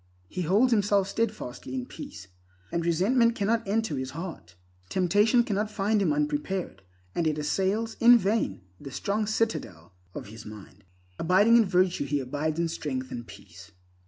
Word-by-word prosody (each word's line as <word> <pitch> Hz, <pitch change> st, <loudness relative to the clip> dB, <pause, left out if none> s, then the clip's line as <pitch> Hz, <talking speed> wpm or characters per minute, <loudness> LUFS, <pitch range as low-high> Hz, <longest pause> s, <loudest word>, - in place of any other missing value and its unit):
He 180 Hz, -, -5 dB
holds 205 Hz, +10 st, +3 dB
himself 205 Hz, -3 st, +3 dB
steadfastly 200 Hz, -, -3 dB
in 125 Hz, -1 st, -3 dB
peace, 95 Hz, -, -10 dB, 0.4 s
and 170 Hz, -, -1 dB
resentment 230 Hz, +8 st, +3 dB
cannot 220 Hz, +1 st, 0 dB
enter 210 Hz, -8 st, 0 dB
his 130 Hz, 0 st, -4 dB
heart. 165 Hz, -, -7 dB, 0.3 s
Temptation 205 Hz, +6 st, +3 dB
does 220 Hz, -, -3 dB
not 210 Hz, +2 st, 0 dB
find 210 Hz, 0 st, 0 dB
him 175 Hz, -6 st, +2 dB
unprepared, 150 Hz, -, -2 dB, 0.3 s
and 170 Hz, -, 0 dB
it 155 Hz, -1 st, 0 dB
assails 195 Hz, +9 st, -1 dB
in 240 Hz, +1 st, +8 dB
vain 200 Hz, -, 0 dB, 0.2 s
the 140 Hz, -, -8 dB
strong 205 Hz, +9 st, -2 dB
citadel 215 Hz, -, -2 dB, 0.2 s
of -, -, -6 dB
his 110 Hz, +1 st, -10 dB
mind. 105 Hz, -3 st, -12 dB, 0.3 s
Abiding 195 Hz, +7 st, +4 dB
in 230 Hz, -, +5 dB
virtue, 185 Hz, -4 st, +1 dB
he 145 Hz, +1 st, 0 dB
abides 150 Hz, +4 st, -2 dB
in 170 Hz, 0 st, +1 dB
strength 130 Hz, -5 st, -4 dB
and 120 Hz, -1 st, -6 dB
peace. 95 Hz, -2 st, -14 dB
180 Hz, 160 wpm, -27 LUFS, 140-215 Hz, 0.4 s, in